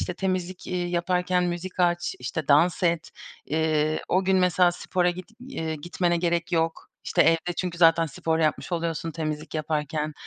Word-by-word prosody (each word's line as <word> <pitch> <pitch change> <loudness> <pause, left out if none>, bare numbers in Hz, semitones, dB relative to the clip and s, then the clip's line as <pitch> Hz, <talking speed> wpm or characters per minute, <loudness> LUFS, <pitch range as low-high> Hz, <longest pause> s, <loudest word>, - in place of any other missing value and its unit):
işte 180 - -3
temizlik, 185 -1 -3
iii, 175 -1 -2
yaparken 180 +1 +1
müzik 175 +1 -4
aç, 175 0 +1
işte 135 +4 -4
dans 165 +6 +4
et, 170 -2 +1 0.4
iii, 155 0 +1
o 185 +1 +2
gün 190 0 +3
mesela 180 -1 +4
spora 180 0 0
git, 180 +1 -8
eee, 165 -11 -4
gitmene 175 +3 -1
gerek 170 0 -1
yok. 165 -1 -1
İşte - - +3
evde 165 +2 +2
çünkü 180 -2 -3
zaten 165 -1 +5
spor 160 +2 -2
yapmış 155 +3 0
oluyorsun 165 -1 -2
temizlik 155 -1 -5
yaparken, 155 0 -2
170 Hz, 165 wpm, -25 LUFS, 160-180 Hz, 0.4 s, zaten